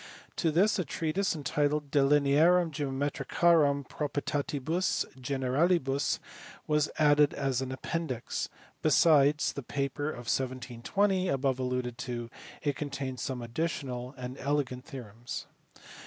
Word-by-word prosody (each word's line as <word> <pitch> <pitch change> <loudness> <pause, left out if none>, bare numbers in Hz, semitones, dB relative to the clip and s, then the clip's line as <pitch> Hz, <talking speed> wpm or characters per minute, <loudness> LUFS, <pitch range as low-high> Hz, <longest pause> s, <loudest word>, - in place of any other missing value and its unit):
To 165 - +2
this 190 +7 +3
a - - +2
treatise, 165 +5 -1
entitled 145 0 0
De 145 - +3
Linearum 150 +5 +4
Geomeiricarum 145 +1 +2
Pro 150 -1 -3
prietatibus 145 +4 -1
Generalibus, 135 +3 +1 0.5
was 150 -1 +2
added 150 -1 +4
as 135 -2 0
an 130 -1 -3
appendix; 130 -2 -3 0.3
besides 150 -1 +4
the 140 - -5
paper 140 +3 -2
of 120 -5 -7
1720 130 - 0
above 135 -1 +1
alluded 125 -1 -2
to, 120 -3 -4 0.3
it 145 -2 0
contains 135 -3 -4
some 125 -2 -3
additional 125 -1 -3
and 125 +1 -6
elegant 135 -3 -1
theorems. 120 -5 -7
140 Hz, 115 wpm, -30 LUFS, 130-155 Hz, 0.5 s, Linearum